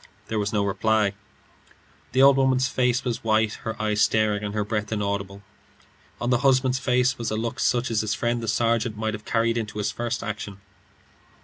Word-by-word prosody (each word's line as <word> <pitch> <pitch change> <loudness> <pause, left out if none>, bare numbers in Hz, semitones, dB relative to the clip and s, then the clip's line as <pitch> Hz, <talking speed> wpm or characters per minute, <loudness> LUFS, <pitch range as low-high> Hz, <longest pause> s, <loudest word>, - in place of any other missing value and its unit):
There 110 - -1
was 105 0 -1
no 105 -2 +1
reply; 105 +1 +1 1.0
the 130 +1 +4
old 140 0 +7
woman's 130 -1 +2
face 125 0 +1
was 120 -3 -3
white, 110 -1 +2
her 110 0 -5
eyes 105 -1 0
staring, 105 -1 +2
and 105 0 -4
her 105 -1 0
breath 105 0 -3
inaudible; 100 -1 -3 0.8
on 120 +1 -1
the 125 - +3
husband's 130 -1 +2
face 125 0 +1
was 115 - -2
a 110 - -2
look 115 +1 -3
such 120 0 +1
as 110 -2 +1
his 110 -1 -1
friend 120 0 -1
the 115 - -5
sergeant 115 0 +1
might 110 0 -2
have 105 0 -7
carried 115 0 +1
into 110 -1 -5
his 105 - -1
first 120 0 -3
action. 105 -3 -5
110 Hz, 195 wpm, -24 LUFS, 105-120 Hz, 1.0 s, old